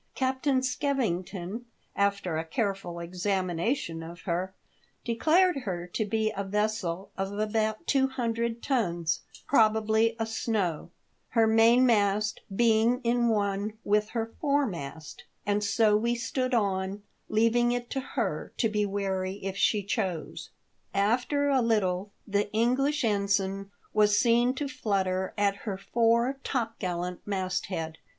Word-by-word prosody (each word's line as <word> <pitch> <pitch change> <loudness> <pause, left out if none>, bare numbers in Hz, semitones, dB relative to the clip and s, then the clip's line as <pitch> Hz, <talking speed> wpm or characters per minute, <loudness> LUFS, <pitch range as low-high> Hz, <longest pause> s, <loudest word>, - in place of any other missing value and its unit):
Captain 260 0 +1
Skevington, 230 -6 -2 0.3
after 200 -4 0
a 160 - -1
careful 195 -2 -2
examination 180 - -1
of 165 +1 -9
her, 185 +2 -2 0.5
declared 315 +9 +3
her 185 -9 -4
to 195 +5 -2
be 215 +1 0
a 200 - -2
vessel 200 -2 -2
of 195 0 -1
about 215 +4 -1
two 270 -1 +3
hundred 235 -2 -2
tons, 170 - 0 0.3
probably 220 -1 +3
a 225 - -1
snow 215 -7 -2 0.2
— - - -44
her 225 - +6
mainmast 220 -2 +4
being 230 +2 +3
in 235 0 +2
one 205 -1 0
with 210 +1 +2
her 225 -1 -3
foremast 170 - -2
— - - -44
and 205 0 +1
so 210 0 +3
we 235 +3 +1
stood 250 +2 -1
on, 195 -2 -1 0.3
leavinp 230 +2 +3
it 245 0 -3
to 270 - -1
her 260 - -3
to 230 - +2
be 210 -1 0
wary 190 -1 -2
if 195 0 -3
she 205 +1 +2
chose. 190 -5 -3 0.5
After 245 +8 +2
a 270 -2 +3
little 205 -4 +1 0.2
the 205 0 +1
Engflish 265 +6 +2
ension 200 -2 0 0.2
was 210 -1 +4
seen 240 +2 +3
to 285 +2 -2
flutter 195 -7 -1
at 200 -1 +2
her 200 -2 -4
fore 235 +5 +1
topgallant 180 -8 -2
masthead. 185 -4 -3
210 Hz, 130 wpm, -28 LUFS, 190-235 Hz, 0.5 s, her